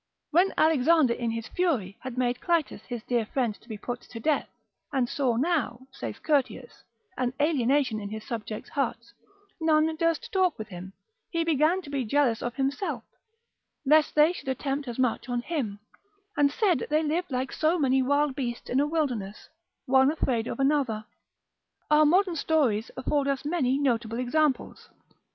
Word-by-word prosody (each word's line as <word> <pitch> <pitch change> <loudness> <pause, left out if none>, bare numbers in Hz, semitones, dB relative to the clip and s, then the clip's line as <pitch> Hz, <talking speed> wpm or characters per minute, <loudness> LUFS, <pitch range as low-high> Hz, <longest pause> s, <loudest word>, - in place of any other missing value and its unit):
When 355 +5 +4
Alexander 315 -3 +4
in 235 -1 -2
his 230 0 -4
fury 260 - -1
had 260 -2 -7
made 250 0 0
Clitus 335 -4 0
his 240 -3 -6
dear 240 -2 0
friend 235 0 -1
to 235 - -22
be 215 - -5
put 245 +3 -5
to 230 - -10
death, 300 +5 0 0.4
and 265 -4 +1
saw 255 -2 0
now 270 -3 0
(saith - - -7
Curtius) 290 -4 -1 0.3
an 250 -1 -1
alienation 275 -5 +2
in 200 -1 -6
his 220 +1 -7
subjects' 220 -2 -5
hearts, 235 -4 -2 0.5
none 315 0 +3
durst 330 -1 0
talk 370 -4 +2
with 220 - -7
him, 185 +1 -9 0.4
he 335 -1 0
began 325 +3 +2
to 285 - -10
be 275 -2 -1
jealous 245 -1 +1
of 240 0 -3
himself, 280 +7 -2 0.8
lest 305 +2 +4
they 305 +3 +5
should 270 - -7
attempt 275 +1 -2
as 240 - -5
much 250 -1 0
on 245 0 -1
him, 250 -12 -3 0.6
and 285 -1 +3
said 360 - +1
they 305 +1 +2
lived 335 +4 -1
like 260 0 -2
so 320 +3 +1
many 265 -4 +3
wild 285 +2 +2
beasts 245 -4 -4
in 255 - +2
a 290 - +2
wilderness, 250 -11 -2 0.4
one 265 0 +5
afraid 245 -7 -1
of - - -5
another. 270 -6 +1 0.9
Our 300 0 +6
modern 365 +2 +3
stories 270 -9 +1
afford 280 +2 0
us 275 0 -1
many 285 -5 +1
notable 235 -5 0
examples. 270 +3 0
270 Hz, 170 wpm, -27 LUFS, 240-310 Hz, 0.9 s, Our